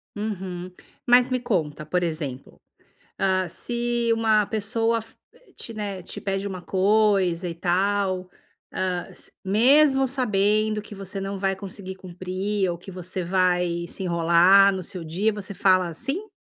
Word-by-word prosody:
Uhum. 185 -4 -5 0.4
Mas 245 +1 +6
me 255 0 0
conta, 155 -10 -2
por 180 +3 0
exemplo, 150 -6 -5 0.6
hã, 185 -1 +1
se 240 +2 -1
uma 220 -2 +3
pessoa 225 +2 0
fi 225 0 -17 0.4
te, 230 - -8
né, 200 -3 -4
te - - -8
pede 195 0 -2
uma 185 -2 -6
coisa 190 -3 +2
e 165 - -6
tal, 185 +1 0 0.4
hã, 180 -2 -2
s - - -9
mesmo 265 +7 +4
sabendo 215 -4 +1
que 210 - -11
você 195 0 -6
não 195 0 -4
vai 195 0 0
conseguir 190 0 -7
cumprir 185 +2 -3
ou 170 - -5
que 190 +2 -11
você 180 0 -4
vai 180 -1 +1
se 190 - -5
enrolar 175 +3 +5
no 185 -1 -4
seu 175 0 -4
dia, 195 +7 0
você 200 -1 -6
fala 185 -2 +3
sim? 350 - -4
195 Hz, 150 wpm, -24 LUFS, 180-215 Hz, 0.6 s, Mas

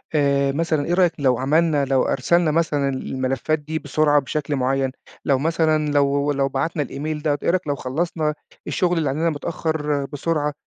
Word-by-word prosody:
آآ، 140 -1 +2
مثلًا 155 0 0
إيه 175 - -1
رأيك 180 -2 +4
لو 130 -3 +2
عملنا 150 +2 +2
لو 135 -1 +2
أرسلنا 165 +5 +2
مثلًا 150 -3 +1
ال 130 -1 -4
الملفّات 135 +4 -1
دي 155 +2 -4
بسرعة 150 0 +2
بشكل 145 +2 -2
معيّن، 135 0 0 0.3
لو 135 -2 +2
مثلًا 155 -1 +1
لو 140 0 +2
لو 140 -1 0
بَعتنا 145 +3 -1
الemail 150 +2 -4
ده، 145 -2 +1
إيه - - +1
رأيك 180 -1 0
لو 145 - 0
خلّصنا 155 +4 -2 0.3
الشغل 180 -1 +1
اللي 155 -4 +1
عندنا 160 +5 0
متأخّر 150 -1 -2
بسرعة، 150 +1 -2
145 Hz, 175 wpm, -22 LUFS, 140-160 Hz, 0.3 s, رأيك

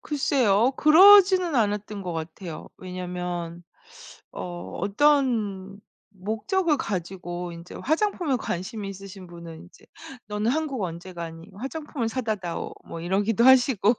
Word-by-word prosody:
글쎄요. 260 -5 +2
그러지는 370 +1 +7
않았던 210 -2 -1
것 180 -2 -4
같아요. 165 +1 -7
왜냐하면 180 -2 -5 0.7
어 175 -1 -7
어떤 205 -4 +1 0.3
목적을 255 - 0
가지고 180 -3 -4
인제 170 +1 -11
화장품에 320 -2 0
관심이 200 -1 -4
있으신 195 -1 -10
분은 170 -1 -10
인제 180 - -19 0.4
"너는 210 +2 0
한국 280 -5 -2
언제 175 +1 -6
가니? 165 +1 -8
화장품을 270 0 -4
사다 225 -3 -1
다오." 175 -4 -5
뭐 165 - -7
이러기도 200 +6 +1
하시고 250 -4 +5
205 Hz, 285 characters per minute, -25 LUFS, 180-265 Hz, 0.7 s, 그러지는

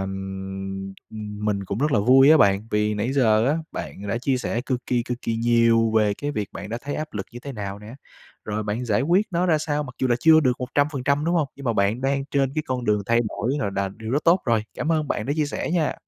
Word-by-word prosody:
ưm, 95 0 -5 0.5
mình 100 -2 -1
cũng 100 +3 -4
rất 145 +1 +1
là - - +4
vui 130 +6 +6
á 160 - +8
bạn, 100 -6 +3
vì 105 0 +1
nãy 110 +5 -1
giờ 115 -4 +3
á 150 - +2 0.2
bạn 100 +1 -6
đã 115 - -1
chia 130 +1 0
sẻ 120 -1 -2
cực 125 -2 -2
kỳ, 120 -1 +1
cực 125 +1 -5
kỳ 115 - -1
nhiều 115 -1 +3
về 105 -2 +3
cái 145 +7 -4
việc 105 -8 -3
bạn 100 - -7
đã 115 +2 -4
thấy 145 +2 -5
áp 155 0 -5
lực 100 -2 -4
như 120 - -8
thế 140 - -7
nào 100 -3 -5
nè, 105 +3 -11 0.5
rồi 105 0 -3
bạn 105 +4 -3
giải 105 -1 +1
quyết 180 +9 +2
nó 175 +1 +1
ra 160 -3 +3
sao 150 -1 -1
mặc 130 -3 -9
dù 130 - +1
là 120 - +3
chưa 160 -1 +6
được 130 -4 +3
100%, 140 +2 0
đúng 170 +1 +1
hông? 155 -5 +1
Nhưng 140 - -10
mà 120 - +1
bạn 105 +3 +1
đang 135 +1 0
trên 135 -2 +1
cái 155 - 0
con 125 -2 -2
đường 105 -1 +1
thay 115 0 +3
đổi 115 +5 -2
rồi 100 - -1
đà 100 0 0
điều 110 +3 -8
rất 145 +4 0
tốt 175 +2 +5
rồi. 115 -4 +1
Cảm 160 +2 -1
ơn 155 -2 0
bạn 105 - -2
đã 140 - 0
chia 150 -2 +1
sẻ 145 - -3
nha! 170 -4 +1
120 Hz, 265 wpm, -23 LUFS, 105-145 Hz, 0.5 s, á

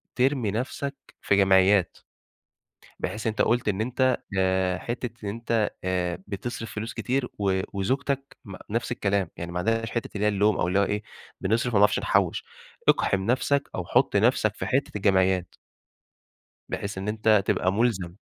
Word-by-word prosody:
ترمي 125 -4 +1
نفسك 135 +5 -3 0.3
في 100 - +2
جمعيّات، 95 -1 +4 1.0
بحيث 110 +1 -3
أنت 110 - 0
قُلت 120 -1 +2
إن 100 +1 -1
أنت 130 +2 +1 0.2
آآ، 95 -1 +1
حِتّة 120 0 -4 0.2
إن - - -1
أنت 115 0 0
آآ، 90 0 -1
بتصرِف 110 +2 -5
فلوس 110 +2 -4
كتير 125 0 -1
و 95 -2 +1
وزوجتك 135 +7 -2
م 100 -2 -8
نفس 115 +2 -2
الكلام، 100 -6 0
يعني 85 0 -5
ما 90 - -2
عندهاش 115 +4 0
حِتّة 115 - -3
اللي 105 +1 0
هي - - +4
اللوم 105 +1 +2
أو - - +1
اللي 95 +2 +2
هو - - +4
إيه، 105 +1 -1 0.4
بنصرِف 115 +4 0
ما 100 - +4
بنعرفش 105 - +4
نحوّش، - - +1 0.5
اقحِم 95 -1 +2
نفسك 140 +4 +1
أو 90 - -3
حُط 125 -1 +2
نفسك 110 -1 +3
في - - -4
حِتّة 135 +2 0
الجمعيّات. 95 -2 +2 1.1
بحيث 100 0 -4
إن 95 +2 -4
أنت 110 -2 +3
تبقى 95 - +1
مُلزَم. 100 -6 0
105 Hz, 165 wpm, -26 LUFS, 95-120 Hz, 1.1 s, جمعيّات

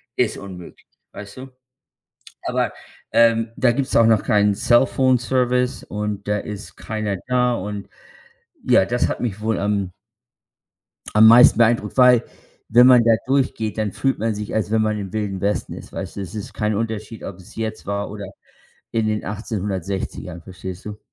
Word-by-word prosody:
ist 115 -3 0
unmöglich, 90 -3 -11 0.3
weißt 100 +3 -10
du? 130 +1 -9 1.0
Aber, - - -1 0.4
ähm, 115 -1 +3
da 125 - +3
gibt's 135 +2 -2
auch 115 - +6
noch 110 -3 +3
keinen 105 -1 +3
Cellphone-Service 125 +1 +2
und 105 -1 -4
da 105 - +1
ist 105 0 -8
keiner 110 -2 -3
da. 125 -1 +2
Und 105 -1 -5 0.8
ja, 120 -6 +4
das 120 +4 0
hat - - -4
mich 105 -4 -3
wohl 110 0 -1
am 100 -2 -1 1.2
am 110 +1 +7
meisten 115 0 +8
beeindruckt, 115 -2 +2
weil, 125 -2 +6 0.4
wenn 120 +2 +6
man 125 -2 +7
da 115 - +4 0.2
durchgeht, 130 -5 0
dann 105 -3 -1
fühlt 135 +6 -1
man 110 0 -1
sich, 105 0 -5
als 110 -1 -1
wenn 110 0 +2
man 110 0 0
im 95 -3 -6
Wilden 105 -3 -3
Westen 100 +1 -1
ist, - - -11
weißt - - -6
du? - - -4
Es 95 0 -7
ist 105 - -7
kein 105 0 -1
Unterschied, 110 0 -4
ob 95 - -7
es 95 -1 -15
jetzt 110 -1 -5
war 100 0 -3
oder 100 -1 -7 0.7
in 115 -1 0
den 105 0 -2
1860ern, 95 -4 -4
verstehst 95 0 -9
du? 105 0 -7
110 Hz, 170 wpm, -21 LUFS, 100-120 Hz, 1.2 s, meisten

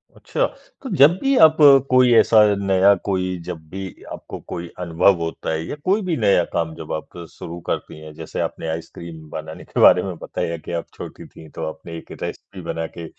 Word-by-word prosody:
अच्छा। - - -1 0.4
तो 265 - -5
जब 145 +4 +8
भी 275 0 +2
आप 155 0 +3 0.3
कोई 130 -1 +5
ऐसा 115 -1 +6 0.3
नया 95 +1 +5
कोई 95 -2 -1
जब 90 -3 -5
भी 95 +1 -6 0.3
आपको - - -8
कोई 85 0 -5
अनुभव 90 +2 +3
होता 80 0 -4
है 80 0 -2
या - - -4
कोई 200 +4 +2
भी 170 - +1
नया 100 -6 +3
काम 80 -1 -1
जब - - -9
आप 80 +2 -6
शुरू 85 +1 -8
करती 75 - -4
हैं 80 0 -11
जैसे - - -7
आपने - - -4
आइसक्रीम 80 0 -7
बनाने 80 0 -7
के - - -5
बारे 90 - +7
में 95 -2 -4
बताया 85 0 -3
कि 80 - -9
आप - - -10
छोटी - - -9
थीं 80 -1 -14
तो 80 - -4
आपने 85 +1 -9
एक - - -12
रेसिपी 95 - -7
बना 80 -1 -4
के 85 - -6
85 Hz, 200 wpm, -21 LUFS, 80-100 Hz, 0.4 s, जब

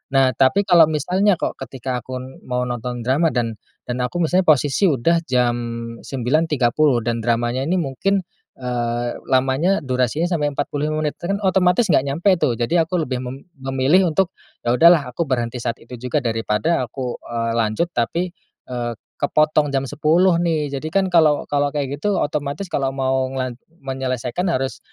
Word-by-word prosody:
Nah 135 -1 +5
tapi 135 +10 +4
kalau 175 -4 +6
misalnya 185 +6 +2
kok - - -3
ketika 130 -1 -4
aku 130 +2 -8 0.3
mau 125 0 -1
nonton 120 0 -4
drama 135 +7 +2
dan, 115 -3 -1 0.3
dan 125 +1 -4
aku 175 +8 -3
misalnya 180 +3 +2
posisi 145 +5 +3
udah 165 +4 +2
jam 125 -2 +2 0.4
09.30 135 -1 +1
dan 115 0 -1
dramanya 120 +2 0
ini 180 - +1
mungkin, 185 +5 0 0.3
eee, 120 -1 -2
lamanya 135 +8 +2
durasinya 130 +5 0
sampai 150 -5 0
45 150 +2 -2
menit 150 - -2
kan 195 +3 -1
otomatis 190 +3 +3
nggak 140 - +3
nyampe 150 +8 +1
tuh, 125 - +2
jadi 160 +9 +1
aku 180 -1 0
lebih 130 -3 -3
mem 130 +6 -8
memilih 135 +8 +2
untuk, 185 +2 +2 0.3
ya 120 - +1
udahlah 165 -5 +6
aku 165 +7 -2
berhenti 120 -2 -1
saat 120 -1 -2
itu 125 +1 -10
juga, 125 +4 -1
daripada 115 +4 0
aku, 125 0 -5
eee, 115 -1 -2
lanjut 110 +9 0
tapi, 170 +9 -1 0.4
eee, 120 -1 -3 0.2
kepotong 150 0 +2
jam 135 0 0
10.00 165 +5 +3
nih, 160 -3 0
jadi 145 +3 -4
kan 195 +1 +2
kalau 160 -5 +3
kalau 145 0 +1
kayak 145 -1 -3
gitu 205 +3 0
otomatis 145 +5 -2
kalau 135 -6 -1
mau 130 -1 0
ngelan 130 -2 -3 0.3
menyelesaikan 130 +2 -3
harus, 135 -3 -2
135 Hz, 165 wpm, -21 LUFS, 125-165 Hz, 0.4 s, kalau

